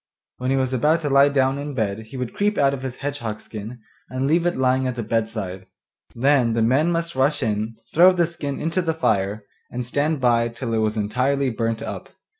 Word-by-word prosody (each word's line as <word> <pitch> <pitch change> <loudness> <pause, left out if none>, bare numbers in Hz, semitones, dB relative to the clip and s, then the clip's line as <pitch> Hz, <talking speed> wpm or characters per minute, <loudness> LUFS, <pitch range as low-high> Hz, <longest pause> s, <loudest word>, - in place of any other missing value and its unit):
When 125 +1 -3
he 135 - +2
was 130 -1 0
about 150 +6 +2
to 145 -3 -2
lie 140 +1 +6
down 135 -1 +1
in 145 -1 -5
bed 110 -1 -2
he 130 - -9
would 125 -2 -4
creep 205 +1 0
out 140 -1 +3
of 135 - -4
his 130 -2 -5
hedgehog 115 -7 -3
skin, 110 +3 -8 0.3
and 130 +2 -2
leave 165 +4 +2
it 175 - -1
lying 130 0 +2
at 125 - -2
the 120 - -3
bedside; 105 -4 -3 0.5
then 125 -1 +3
the 115 0 +1
men 140 +9 +3
must 170 0 -2
rush 135 +2 +2
in, 110 0 -1 0.2
throw 180 +3 +7
the 175 -2 +2
skin 150 -4 -5
into 165 +4 0
the 165 -2 -1
fire, 105 -7 0 0.2
and 125 0 -4
stand 145 +4 0
by 120 -2 +3
till 115 0 -5
it 110 - +1
was 110 0 0
entirely 130 +6 0
burnt 115 0 -2
up. - - -6
130 Hz, 220 wpm, -22 LUFS, 115-145 Hz, 0.5 s, throw